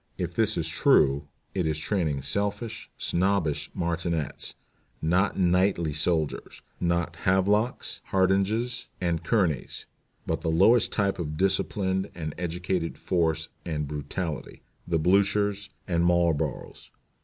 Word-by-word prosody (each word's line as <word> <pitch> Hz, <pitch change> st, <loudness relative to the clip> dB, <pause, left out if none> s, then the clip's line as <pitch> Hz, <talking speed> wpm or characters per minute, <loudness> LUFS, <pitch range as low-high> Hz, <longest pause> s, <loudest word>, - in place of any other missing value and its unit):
If -, -, -3 dB
this -, -, +3 dB
be -, -, 0 dB
true, 70 Hz, +1 st, +3 dB, 0.3 s
it 90 Hz, -4 st, 0 dB
is 80 Hz, -1 st, 0 dB
training 80 Hz, -5 st, -1 dB
selfish, 100 Hz, +8 st, -2 dB
snobbish 90 Hz, -4 st, 0 dB
martinets 85 Hz, -3 st, -2 dB, 0.4 s
not 90 Hz, +5 st, +1 dB
knightly 90 Hz, -3 st, +2 dB
soldiers, 80 Hz, 0 st, -1 dB, 0.2 s
not 85 Hz, -1 st, 0 dB
Havelocks, 100 Hz, +6 st, +1 dB
Hardinges, 100 Hz, +6 st, +1 dB
and 85 Hz, -2 st, -1 dB
Kearneys 85 Hz, -, 0 dB, 0.4 s
but -, -, -2 dB
the 80 Hz, -, -1 dB
lowest 100 Hz, +9 st, +4 dB
type 100 Hz, -2 st, 0 dB
of 75 Hz, -3 st, -4 dB
disciplined 95 Hz, +1 st, +1 dB
and 75 Hz, -3 st, -4 dB
educated 90 Hz, 0 st, -2 dB
force 80 Hz, -3 st, 0 dB
and 75 Hz, -3 st, -3 dB
brutality 75 Hz, +2 st, -5 dB, 0.2 s
the 85 Hz, -1 st, +1 dB
Bluchers 100 Hz, +3 st, +2 dB, 0.2 s
and 85 Hz, -2 st, +1 dB
Marlboroughs. 85 Hz, -3 st, 0 dB
90 Hz, 115 wpm, -27 LUFS, 80-95 Hz, 0.4 s, lowest